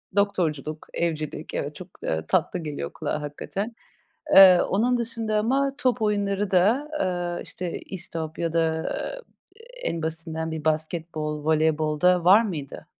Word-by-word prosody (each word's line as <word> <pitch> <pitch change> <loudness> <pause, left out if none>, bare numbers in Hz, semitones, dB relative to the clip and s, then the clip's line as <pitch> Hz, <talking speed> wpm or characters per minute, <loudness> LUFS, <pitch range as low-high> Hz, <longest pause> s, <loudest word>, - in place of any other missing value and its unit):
Doktorculuk, 155 -7 0
evcilik, 155 -2 -3
evet, 145 +1 -3
çok, 185 - -9 0.2
ııı, 80 0 -2
tatlı 180 - +1
geliyor 145 - -5
kulağa 150 - -3
hakikaten. 195 +9 -5 0.6
Eee, 185 -2 +10
onun 240 +5 +1
dışında 225 -2 0
ama 270 +6 +1
top 250 -4 +1
oyunları 205 -1 0
da, 215 +11 +3
ııı, 175 -2 -1
işte, 180 -2 -5
istop 165 -4 -5
ya 165 -1 -1
da, 160 -1 +1 0.7
eee, - - -7
en 165 -1 -4
basitinden 160 0 -3
bir 160 -2 -5
basketbol, 155 -1 -2
voleybol 155 -1 +1
da 180 0 +4
var 195 +5 +7
mıydı? 160 - -6
170 Hz, 140 wpm, -25 LUFS, 155-205 Hz, 0.7 s, Eee